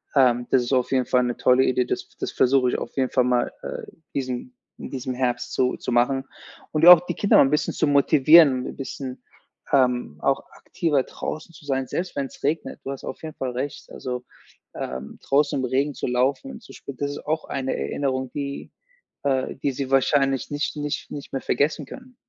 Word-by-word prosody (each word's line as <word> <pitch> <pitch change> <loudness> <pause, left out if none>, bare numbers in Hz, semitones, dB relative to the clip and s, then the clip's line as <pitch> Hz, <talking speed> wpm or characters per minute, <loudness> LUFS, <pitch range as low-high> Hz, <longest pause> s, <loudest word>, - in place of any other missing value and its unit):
ähm, 125 -3 +4
das 130 - +4
ist 120 - -2
auf 125 -2 +1
jeden 130 -2 +2
Fall 125 0 +2
'ne 120 -1 -2
tolle 125 +1 +4
Idee. 125 -1 +2
Das - - -3
das - - -3
versuche 130 0 +3
ich - - -1
auf - - -6
jeden 130 -1 +1
Fall 125 - +3
mal, 125 -1 +1
äh, - - -5 0.3
diesem 130 - -4 0.3
in - - -8
diesem 130 -1 -4
Herbst 125 -1 -1
so 125 0 +1
zu - - -5
machen 125 +3 +2 0.5
und 155 +1 +2
auch 175 -1 +10
die - - -2
Kinder 200 - +4
mal - - +8
'n - - +1
bisschen 150 +1 0
zu - - +1
motivieren, 140 -1 +6
'n - - -7
bisschen, 130 -1 -7 0.5
ähm, 125 - +2
auch - - +1
aktiver 150 -5 -1
draußen 155 +5 -6
zu 150 - -15
sein, 135 -2 -1
selbst 180 +6 -4
wenn's 140 -2 -5
regnet. 155 +3 -1
Du 135 - -4
hast 135 - -7
auf - - -7
jeden 155 -1 -6
Fall 130 -1 -3
recht, 130 +3 -5
also, 125 -1 -5 0.5
ähm, 65 +2 -6
draußen 140 +1 +2
im 130 - -1
Regen 135 +3 0
zu - - -4
laufen 130 - 0
und 230 -3 -10
zu - - -14
spielen, 140 - -9
das 140 +2 -2
ist 145 - -8
auch 155 +1 -1
eine 135 -1 -2
Erinnerung, 130 - -2
die 140 -1 -5 0.6
äh, 135 -2 0
die 140 +1 -1
sie 135 0 -4
wahrscheinlich 135 0 +2
nicht 145 +1 -2
nicht 150 0 -4
nicht 145 - -8
mehr 135 - -3
vergessen 150 +1 0
können. 255 - -12
135 Hz, 205 wpm, -24 LUFS, 125-145 Hz, 0.6 s, auch